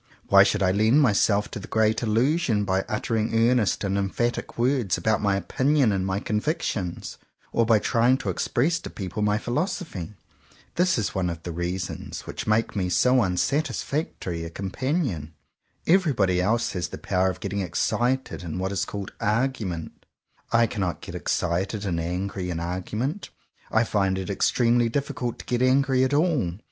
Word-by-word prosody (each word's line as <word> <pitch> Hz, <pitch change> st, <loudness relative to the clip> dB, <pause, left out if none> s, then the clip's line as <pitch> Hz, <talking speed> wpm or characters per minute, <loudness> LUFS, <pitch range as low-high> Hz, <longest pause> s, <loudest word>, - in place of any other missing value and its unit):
Why -, -, +8 dB
should -, -, +3 dB
I 95 Hz, -, +3 dB
lend 110 Hz, +8 st, +4 dB
myself 105 Hz, -5 st, +3 dB
to -, -, -5 dB
the 100 Hz, -, -9 dB
great 110 Hz, 0 st, +2 dB
Illusion 115 Hz, 0 st, +1 dB
by 95 Hz, 0 st, +1 dB
uttering 110 Hz, 0 st, -1 dB, 0.2 s
earnest 120 Hz, -6 st, +1 dB
and 100 Hz, 0 st, 0 dB
emphatic 120 Hz, +5 st, -2 dB
words 120 Hz, -5 st, +1 dB
about 110 Hz, -2 st, +1 dB
my 100 Hz, -2 st, +2 dB
opinions 130 Hz, -, +2 dB
and 95 Hz, -1 st, 0 dB
my 95 Hz, +1 st, 0 dB
convictions, 105 Hz, -, -2 dB, 0.3 s
or 115 Hz, -1 st, +2 dB
by 115 Hz, -2 st, +6 dB
trying 120 Hz, +4 st, +3 dB
to -, -, -2 dB
express 160 Hz, +8 st, 0 dB
to -, -, -8 dB
people 95 Hz, +1 st, -5 dB
my 105 Hz, 0 st, +2 dB
philos 125 Hz, -, -1 dB
ophy? 105 Hz, -, -7 dB, 0.6 s
This 180 Hz, -1 st, +2 dB
is 105 Hz, -4 st, -1 dB
one 90 Hz, -2 st, 0 dB
of 85 Hz, -1 st, -6 dB
the 85 Hz, -, -4 dB
reasons 90 Hz, +2 st, -4 dB
which -, -, -7 dB
make 110 Hz, +2 st, +1 dB
me 95 Hz, -3 st, 0 dB
so 125 Hz, +7 st, +4 dB
unsatisfactory 115 Hz, -, -1 dB
a 85 Hz, -, -5 dB
companion. 95 Hz, -, -2 dB, 0.5 s
Everybody 130 Hz, -, +3 dB
else 115 Hz, +5 st, +1 dB
has 90 Hz, -2 st, -2 dB
the -, -, -8 dB
power 95 Hz, +1 st, +1 dB
of 95 Hz, -, -5 dB
getting 100 Hz, 0 st, -3 dB
excited 120 Hz, +9 st, -1 dB
in 85 Hz, -1 st, -5 dB
what 95 Hz, +1 st, -2 dB
is 100 Hz, -, -1 dB
called 100 Hz, -2 st, -6 dB
"argument." 105 Hz, -7 st, -2 dB, 0.4 s
I 115 Hz, 0 st, +5 dB
cannot 95 Hz, -5 st, -3 dB
get -, -, -8 dB
excited 95 Hz, +5 st, -1 dB
and 85 Hz, -4 st, -1 dB
angry 90 Hz, +2 st, -3 dB
in 85 Hz, -2 st, -3 dB
argument. 105 Hz, -, -3 dB, 0.4 s
I 110 Hz, -, +4 dB
find 95 Hz, -4 st, 0 dB
it 95 Hz, +1 st, -3 dB
extremely 120 Hz, +3 st, +2 dB
difficult 125 Hz, -2 st, -2 dB
to -, -, -10 dB
get 125 Hz, 0 st, -1 dB
angry 130 Hz, 0 st, +3 dB
at 130 Hz, -, +1 dB
all. 150 Hz, -, +1 dB
105 Hz, 170 wpm, -25 LUFS, 95-125 Hz, 0.6 s, Why